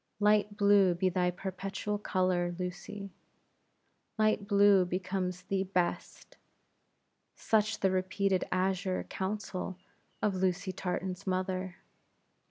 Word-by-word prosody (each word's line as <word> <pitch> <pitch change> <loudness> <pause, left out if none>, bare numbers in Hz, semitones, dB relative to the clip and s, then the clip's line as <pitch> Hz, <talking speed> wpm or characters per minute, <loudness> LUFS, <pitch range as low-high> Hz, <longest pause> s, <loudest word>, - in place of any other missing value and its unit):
Light 210 0 +3
blue 200 -3 +5
be 185 +2 +1
thy 180 0 +1
perpetual 195 +3 -4
color, 185 -3 0
Lucy; 195 +2 -6 1.1
light 215 -2 +2
blue 200 -2 +6
becomes 180 0 -3
thee 195 -1 -1
best 180 -2 -3 1.0
such 215 -1 +1
the 190 - +3
repeated 185 0 +1
azure 185 0 0
counsel 190 -1 -4 0.4
of 210 - +1
Lucy 185 +1 0
Tartan's 185 +1 -4
mother. 185 -1 -2
190 Hz, 100 wpm, -31 LUFS, 185-200 Hz, 1.1 s, blue